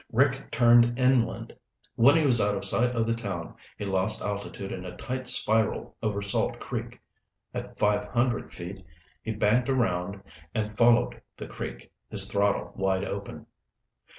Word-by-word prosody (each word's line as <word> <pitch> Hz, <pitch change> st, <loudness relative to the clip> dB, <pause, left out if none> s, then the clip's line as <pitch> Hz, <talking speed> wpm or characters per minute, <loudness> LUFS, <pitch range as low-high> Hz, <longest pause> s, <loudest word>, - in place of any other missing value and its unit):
Rick 130 Hz, +2 st, +2 dB
turned 120 Hz, 0 st, +5 dB
inland. 130 Hz, -2 st, +1 dB, 0.4 s
When 135 Hz, +6 st, +6 dB
he 160 Hz, -2 st, +3 dB
was 120 Hz, -5 st, +4 dB
out 100 Hz, 0 st, +1 dB
of 100 Hz, -, -3 dB
sight 125 Hz, +1 st, +2 dB
of 115 Hz, -1 st, +1 dB
the 115 Hz, -, +1 dB
town, 115 Hz, -4 st, -5 dB, 0.2 s
he 105 Hz, -, -4 dB
lost 95 Hz, +2 st, 0 dB
altitude 100 Hz, -1 st, -4 dB
in 90 Hz, -, -5 dB
a 90 Hz, -1 st, -8 dB
tight 130 Hz, 0 st, -4 dB
spiral 110 Hz, -3 st, +1 dB
over 105 Hz, -2 st, -1 dB
Salt 100 Hz, -, 0 dB
Creek. -, -, -5 dB, 0.5 s
At -, -, -6 dB
five 105 Hz, 0 st, +2 dB
hundred 120 Hz, 0 st, 0 dB
feet, 95 Hz, +2 st, -8 dB, 0.4 s
he 110 Hz, -, -4 dB
banked 110 Hz, +4 st, +2 dB
around 100 Hz, -6 st, 0 dB, 0.3 s
and 110 Hz, -1 st, -2 dB
followed 120 Hz, +1 st, +3 dB, 0.2 s
the -, -, -6 dB
creek, -, -, -7 dB, 0.2 s
his -, -, +1 dB
throttle 100 Hz, 0 st, 0 dB
wide 95 Hz, 0 st, 0 dB
open. 100 Hz, 0 st, -6 dB
110 Hz, 155 wpm, -27 LUFS, 100-120 Hz, 0.5 s, When